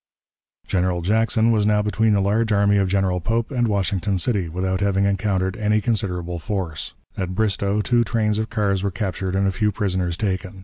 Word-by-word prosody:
General 90 Hz, -2 st, 0 dB
Jackson 110 Hz, +3 st, +2 dB
was 105 Hz, -2 st, +2 dB
now 105 Hz, -1 st, +3 dB
between 110 Hz, +1 st, +2 dB
the 100 Hz, -, +2 dB
large 110 Hz, +3 st, +1 dB
army 100 Hz, 0 st, +3 dB
of 100 Hz, -1 st, +2 dB
General 95 Hz, -2 st, +1 dB
Pope 115 Hz, -, -1 dB
and 120 Hz, -3 st, +1 dB
Washington 100 Hz, -1 st, 0 dB
City, 95 Hz, -3 st, -1 dB
without 95 Hz, +2 st, -2 dB
having 100 Hz, -1 st, +2 dB
encountered 95 Hz, -1 st, 0 dB
any 105 Hz, -1 st, +2 dB
considerable 90 Hz, -6 st, -2 dB
force. 85 Hz, -5 st, -4 dB, 0.2 s
At 95 Hz, -1 st, -3 dB
Bristoe 100 Hz, -1 st, 0 dB
two 120 Hz, +2 st, +2 dB
trains 110 Hz, -2 st, 0 dB
of 110 Hz, -, -2 dB
cars 100 Hz, -3 st, 0 dB
were 100 Hz, -, 0 dB
captured 95 Hz, -1 st, -3 dB
and 100 Hz, +1 st, +2 dB
a 95 Hz, -, +2 dB
few 105 Hz, +2 st, 0 dB
prisoners 95 Hz, -4 st, -1 dB
taken. 95 Hz, -1 st, -3 dB
100 Hz, 185 wpm, -22 LUFS, 95-105 Hz, 0.2 s, now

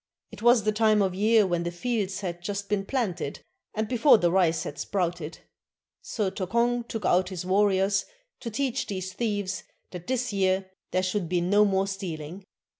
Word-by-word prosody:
It -, -, -11 dB
was 240 Hz, -1 st, +5 dB
the 215 Hz, -, +2 dB
time 215 Hz, -1 st, +3 dB
of 190 Hz, -2 st, 0 dB
year 215 Hz, +2 st, +4 dB
when 175 Hz, -2 st, 0 dB
the 170 Hz, -, -2 dB
fields 200 Hz, +1 st, -2 dB
had 175 Hz, -3 st, -4 dB
just 200 Hz, +2 st, -4 dB
been 200 Hz, -2 st, 0 dB
planted, 185 Hz, -, -2 dB, 0.3 s
and 215 Hz, 0 st, -1 dB
before 250 Hz, +3 st, +5 dB
the 175 Hz, -4 st, +2 dB
rice 170 Hz, -4 st, +2 dB
had 145 Hz, -, -7 dB
sprouted; 175 Hz, -4 st, -2 dB, 0.6 s
so 205 Hz, -5 st, -2 dB
Tokong 235 Hz, +5 st, 0 dB
took 225 Hz, -5 st, -4 dB
out 185 Hz, +1 st, +3 dB
his 180 Hz, -2 st, -5 dB
warriors 195 Hz, +1 st, +2 dB, 0.3 s
to 235 Hz, -, -5 dB
teach 260 Hz, +3 st, -1 dB
these 185 Hz, -2 st, -4 dB
thieves 205 Hz, -3 st, -2 dB, 0.3 s
that 180 Hz, -2 st, -8 dB
this 250 Hz, -3 st, -1 dB
year 190 Hz, -1 st, +1 dB, 0.2 s
there 185 Hz, -, 0 dB
should 185 Hz, -2 st, -1 dB
be 180 Hz, -1 st, +1 dB
no 200 Hz, +4 st, +4 dB
more 195 Hz, -1 st, +2 dB
stealing. 185 Hz, -2 st, -6 dB
195 Hz, 180 wpm, -27 LUFS, 180-215 Hz, 0.6 s, was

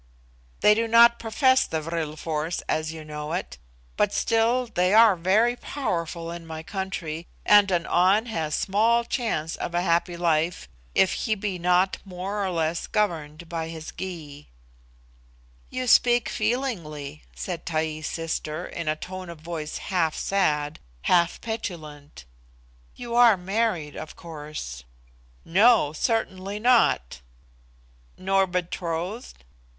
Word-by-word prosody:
"They 210 Hz, -, +7 dB
do 230 Hz, +2 st, 0 dB
not 235 Hz, +1 st, +6 dB
profess 260 Hz, +4 st, +3 dB
the 160 Hz, -, -2 dB
vril 160 Hz, -1 st, -3 dB
force 160 Hz, +2 st, -3 dB
as 155 Hz, 0 st, -1 dB
you 160 Hz, -1 st, -9 dB
know 150 Hz, 0 st, -5 dB
it. -, -, -4 dB, 0.4 s
But -, -, +2 dB
still 230 Hz, +2 st, +2 dB
they 185 Hz, -3 st, +1 dB
are 225 Hz, -3 st, +7 dB
very 205 Hz, +8 st, +2 dB
powerful 170 Hz, -, -3 dB
in 170 Hz, -1 st, -8 dB
my 160 Hz, 0 st, -6 dB
country, 175 Hz, -4 st, -5 dB, 0.2 s
and 205 Hz, -1 st, +6 dB
an 175 Hz, -2 st, +1 dB
An 190 Hz, +5 st, +3 dB
has 160 Hz, -9 st, -2 dB
small 225 Hz, +4 st, +2 dB
chance 220 Hz, -, -2 dB
of 170 Hz, -, -4 dB
a 175 Hz, -, +1 dB
happy 170 Hz, 0 st, +1 dB
life 170 Hz, 0 st, 0 dB, 0.3 s
if 190 Hz, -, +4 dB
he 220 Hz, -, -1 dB
be 195 Hz, -3 st, -3 dB
not 180 Hz, +2 st, +2 dB
more 195 Hz, +2 st, -4 dB
or 190 Hz, -, -1 dB
less 165 Hz, -1 st, -1 dB
governed 165 Hz, -6 st, -2 dB
by 165 Hz, -1 st, -4 dB
his 160 Hz, -1 st, -8 dB
Gy." 155 Hz, -6 st, -7 dB, 1.2 s
"You 255 Hz, 0 st, -3 dB
speak 240 Hz, 0 st, +4 dB
feelingly," 170 Hz, -, -3 dB
said 180 Hz, -3 st, -5 dB
Taee's 155 Hz, -2 st, -2 dB
sister, 160 Hz, -2 st, -3 dB
in 170 Hz, -2 st, -6 dB
a 155 Hz, -, +1 dB
tone 185 Hz, +2 st, -8 dB
of 165 Hz, -3 st, -10 dB
voice 160 Hz, -2 st, -5 dB
half 170 Hz, -5 st, 0 dB
sad, 150 Hz, -6 st, 0 dB, 0.2 s
half 170 Hz, -1 st, +3 dB
petulant. 155 Hz, -, -7 dB, 0.7 s
"You 240 Hz, -1 st, -7 dB
are 235 Hz, -4 st, +6 dB
married, 185 Hz, -5 st, -1 dB
of 155 Hz, -, -8 dB
course." 150 Hz, -, -8 dB, 0.6 s
"No 200 Hz, -3 st, +4 dB
certainly 200 Hz, 0 st, -1 dB
not." 225 Hz, -, +2 dB, 1.0 s
"Nor 195 Hz, 0 st, +2 dB
betrothed?" 180 Hz, -, -4 dB
175 Hz, 135 wpm, -25 LUFS, 160-210 Hz, 1.2 s, They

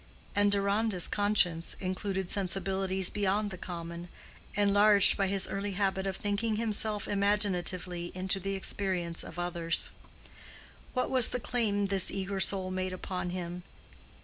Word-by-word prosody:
And 205 Hz, 0 st, +3 dB
Deronda's 200 Hz, -1 st, +1 dB
conscience 195 Hz, -5 st, +1 dB
included 190 Hz, 0 st, -3 dB
sensibilities 190 Hz, 0 st, -1 dB
beyond 205 Hz, 0 st, -1 dB
the 185 Hz, -, -7 dB
common, 170 Hz, -1 st, -7 dB, 0.5 s
enlarged 205 Hz, 0 st, +6 dB
by 195 Hz, -, 0 dB
his 195 Hz, 0 st, +2 dB
early 200 Hz, 0 st, -3 dB
habit 190 Hz, 0 st, -1 dB
of 190 Hz, 0 st, -3 dB
thinking 210 Hz, +2 st, -1 dB
himself 215 Hz, -1 st, -1 dB
imaginatively 185 Hz, -4 st, 0 dB
into 190 Hz, +1 st, +1 dB
the 195 Hz, +1 st, -3 dB
experience 185 Hz, -3 st, -1 dB
of 165 Hz, -, -10 dB
others. 170 Hz, -1 st, 0 dB, 1.0 s
What 255 Hz, -, -1 dB
was 255 Hz, -3 st, +5 dB
the 250 Hz, -, -2 dB
claim 215 Hz, -4 st, -1 dB
this 195 Hz, -1 st, +4 dB
eager 195 Hz, 0 st, -3 dB
soul 190 Hz, -1 st, +1 dB
made 185 Hz, 0 st, -3 dB
upon 185 Hz, -1 st, -4 dB
him? 175 Hz, 0 st, -5 dB
195 Hz, 135 wpm, -30 LUFS, 185-205 Hz, 1.0 s, enlarged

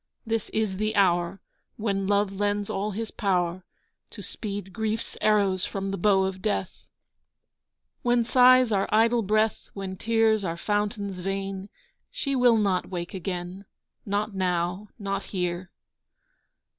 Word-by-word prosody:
This 225 Hz, -1 st, -2 dB
is 215 Hz, -4 st, -1 dB
the 215 Hz, +2 st, -1 dB
hour 175 Hz, -1 st, +2 dB, 0.4 s
When 195 Hz, -3 st, -1 dB
Love 205 Hz, 0 st, +2 dB
lends 205 Hz, +1 st, -1 dB
all 200 Hz, +2 st, -1 dB
his 220 Hz, +2 st, -4 dB
power 180 Hz, -3 st, 0 dB, 0.5 s
To -, -, -9 dB
speed 200 Hz, -3 st, -6 dB
grief's 220 Hz, 0 st, -2 dB
arrows 200 Hz, -3 st, +3 dB
from 195 Hz, 0 st, -3 dB
the 195 Hz, -, -2 dB
bow 195 Hz, 0 st, +4 dB
of 190 Hz, 0 st, -3 dB
Death, 195 Hz, -2 st, -3 dB, 1.1 s
When 240 Hz, -1 st, +3 dB
sighs 255 Hz, 0 st, +6 dB
are 195 Hz, -1 st, +1 dB
idle 230 Hz, +2 st, +4 dB
breath, 215 Hz, +1 st, +1 dB
When 195 Hz, -1 st, -5 dB
tears 225 Hz, 0 st, +2 dB
are 170 Hz, -2 st, -2 dB
fountains 205 Hz, 0 st, -2 dB
vain. 195 Hz, +1 st, -3 dB, 0.4 s
She 280 Hz, -, -2 dB
will 245 Hz, -3 st, +5 dB
not 195 Hz, -4 st, +1 dB
wake 175 Hz, -1 st, -5 dB
again, 185 Hz, +1 st, -5 dB, 0.4 s
Not 205 Hz, +1 st, -1 dB
now, 180 Hz, +1 st, -1 dB
not 195 Hz, -2 st, -2 dB
here. 180 Hz, -1 st, -3 dB
200 Hz, 135 wpm, -26 LUFS, 190-215 Hz, 1.1 s, sighs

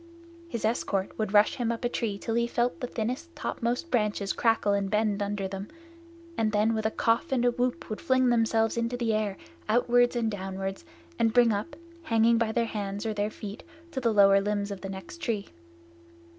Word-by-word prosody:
His 235 Hz, -9 st, -3 dB
escort 200 Hz, -4 st, 0 dB
would 215 Hz, -2 st, -1 dB
rush 210 Hz, 0 st, +4 dB
him 235 Hz, -2 st, 0 dB
up 235 Hz, +1 st, -4 dB
a -, -, +4 dB
tree 225 Hz, -4 st, -2 dB
till 225 Hz, +3 st, -4 dB
he 235 Hz, +1 st, +2 dB
felt 240 Hz, +1 st, 0 dB
the 250 Hz, -, -3 dB
thinnest 255 Hz, +10 st, -4 dB
topmost 245 Hz, +8 st, -2 dB
branches 210 Hz, -4 st, 0 dB
crackle 225 Hz, -3 st, +2 dB
and 200 Hz, -1 st, 0 dB
bend 210 Hz, -1 st, +1 dB
under 200 Hz, -1 st, -2 dB
them, 195 Hz, +1 st, -6 dB, 0.7 s
and 220 Hz, -5 st, +1 dB
then 215 Hz, +2 st, +2 dB
with 220 Hz, 0 st, 0 dB
a -, -, 0 dB
cough 230 Hz, +3 st, +1 dB
and 245 Hz, -2 st, +2 dB
a 245 Hz, -, +4 dB
whoop 245 Hz, +1 st, -2 dB
would 215 Hz, -, -5 dB
fling 260 Hz, -1 st, +3 dB
themselves 225 Hz, -1 st, +2 dB
into 235 Hz, +1 st, -1 dB
the 235 Hz, -2 st, 0 dB
air 210 Hz, -3 st, -1 dB, 0.3 s
outward 245 Hz, +2 st, +3 dB
and 230 Hz, -2 st, 0 dB
downward, 195 Hz, -1 st, -4 dB, 0.4 s
and 225 Hz, -1 st, +3 dB
bring 240 Hz, -2 st, +5 dB
up, 205 Hz, +12 st, -4 dB, 0.3 s
hanging 230 Hz, -5 st, +3 dB
by 230 Hz, -1 st, +1 dB
their 235 Hz, +1 st, +1 dB
hands 205 Hz, -1 st, -4 dB
or 220 Hz, -, -1 dB
their 205 Hz, 0 st, -1 dB
feet 210 Hz, -1 st, -8 dB, 0.3 s
to 265 Hz, -, -3 dB
the 230 Hz, -2 st, +2 dB
lower 200 Hz, -1 st, +6 dB
limbs 205 Hz, 0 st, -1 dB
of 195 Hz, -2 st, -6 dB
the 195 Hz, -, -5 dB
next 190 Hz, -, -8 dB
tree. 215 Hz, -8 st, -2 dB
220 Hz, 200 wpm, -28 LUFS, 205-235 Hz, 0.7 s, lower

